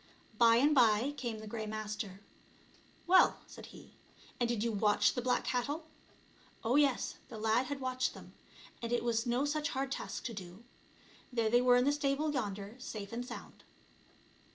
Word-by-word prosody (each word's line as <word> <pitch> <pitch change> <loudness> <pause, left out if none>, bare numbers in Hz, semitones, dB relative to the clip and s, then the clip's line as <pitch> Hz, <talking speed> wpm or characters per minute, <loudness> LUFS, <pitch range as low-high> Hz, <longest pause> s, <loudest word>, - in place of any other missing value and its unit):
By 230 -1 +7
and 285 +6 +4
by 240 0 +4
came 240 -5 -4
the 215 - -9
Grey 215 0 -5
Master. 210 -2 -5 0.8
"Well," 370 +2 +5
said - - -11
he, - - -14 0.5
"and 240 -1 +1
did 230 -3 0
you 230 - 0
watch 205 -1 +3
the 245 - -2
black 250 0 +1
cattle?" 285 +6 -2 0.8
Oh, 235 +3 +1
yes, 285 -3 +2
the 225 - -8
lad 225 +4 +1
had 285 0 -4
watched 255 -1 -1
them, - - -12 0.5
and 235 0 -4
it 240 - +1
was 235 0 0
no 245 +4 +1
such 300 0 -1
hard 270 0 -2
task - - -4
to 235 - -4
do; 190 +1 -9 0.7
there 230 -3 0
they 240 +1 +5
were 250 0 +5
in 250 +1 +4
the 285 - +4
stable 290 +1 0
yonder, 205 -4 -3
safe 210 -5 -7
and 240 +1 -3
sound. 245 - -10
240 Hz, 175 wpm, -33 LUFS, 220-265 Hz, 0.8 s, By